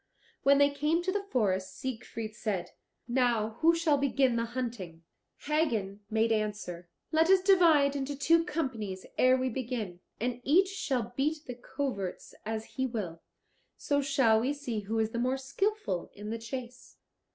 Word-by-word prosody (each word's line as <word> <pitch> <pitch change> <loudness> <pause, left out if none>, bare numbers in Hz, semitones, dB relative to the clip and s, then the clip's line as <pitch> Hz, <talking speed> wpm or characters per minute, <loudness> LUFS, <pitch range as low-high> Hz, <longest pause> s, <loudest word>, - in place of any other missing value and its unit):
When 280 0 +5
they 285 0 +5
came 300 +4 +1
to 375 - 0
the 405 +1 -1
forest 190 -5 0
Siegfried 230 -3 -5
said, 190 -6 -3 0.4
"Now 235 -3 +1
who 330 +1 +5
shall 320 -4 +2
begin 270 -2 +2
the 230 0 0
hunting?" 230 -9 -5 0.4
Hagen 230 -11 0
made 225 +1 +2
answer, 210 -5 -2 0.2
"Let 320 +1 +3
us 380 -1 +6
divide 330 -8 +5
into 280 +1 -2
two 330 +4 +4
companies 235 - -3
ere 255 0 +6
we 260 0 0
begin, 225 -7 -4 0.2
and 245 +1 -2
each 365 +8 +4
shall 260 - -2
beat 300 +3 -1
the 250 - -5
coverts 240 -6 -4
as 220 0 -3
he 260 +3 -2
will; 190 -9 -5 0.6
so 285 -1 +1
shall 265 -5 +3
we 255 +5 0
see 255 -6 -4
who 210 +2 -3
is 220 0 +1
the 235 - -2
more 255 +2 +1
skilful 275 - -2
in 210 +1 -6
the 230 - -3
chase." 250 +2 -8
250 Hz, 165 wpm, -30 LUFS, 220-285 Hz, 0.6 s, us